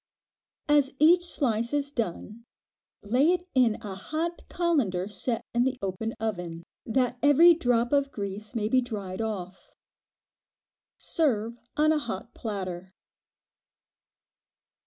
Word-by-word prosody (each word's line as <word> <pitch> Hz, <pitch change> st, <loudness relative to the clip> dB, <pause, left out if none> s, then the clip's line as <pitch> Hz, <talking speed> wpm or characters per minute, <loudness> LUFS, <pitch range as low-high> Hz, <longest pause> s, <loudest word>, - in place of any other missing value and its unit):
As 290 Hz, -2 st, +4 dB
each 345 Hz, +4 st, +5 dB
slice 235 Hz, -7 st, -1 dB
is 285 Hz, -1 st, -1 dB
done, 230 Hz, -1 st, -4 dB, 0.6 s
lay 255 Hz, -, +3 dB
it 360 Hz, 0 st, -3 dB
in 245 Hz, -5 st, +4 dB
a 205 Hz, -2 st, -5 dB
hot 315 Hz, -, -4 dB
colander 260 Hz, -, 0 dB
set 220 Hz, +3 st, -3 dB
in 240 Hz, +1 st, +3 dB
the 260 Hz, 0 st, 0 dB
open 200 Hz, +4 st, -3 dB
oven, 175 Hz, -6 st, -4 dB, 0.2 s
that 250 Hz, +1 st, 0 dB
every 295 Hz, +5 st, +7 dB
drop 245 Hz, -5 st, +1 dB
of 280 Hz, -1 st, +2 dB
grease 205 Hz, +1 st, -5 dB
may 215 Hz, -2 st, 0 dB
be 255 Hz, +3 st, +3 dB
dried 205 Hz, -5 st, -5 dB
off. 190 Hz, -4 st, -6 dB, 1.2 s
Serve 235 Hz, -, -1 dB, 0.2 s
on 305 Hz, +1 st, +4 dB
a 310 Hz, -, +2 dB
hot 230 Hz, -3 st, -6 dB
platter. 190 Hz, -4 st, -5 dB
235 Hz, 120 wpm, -27 LUFS, 205-285 Hz, 1.2 s, every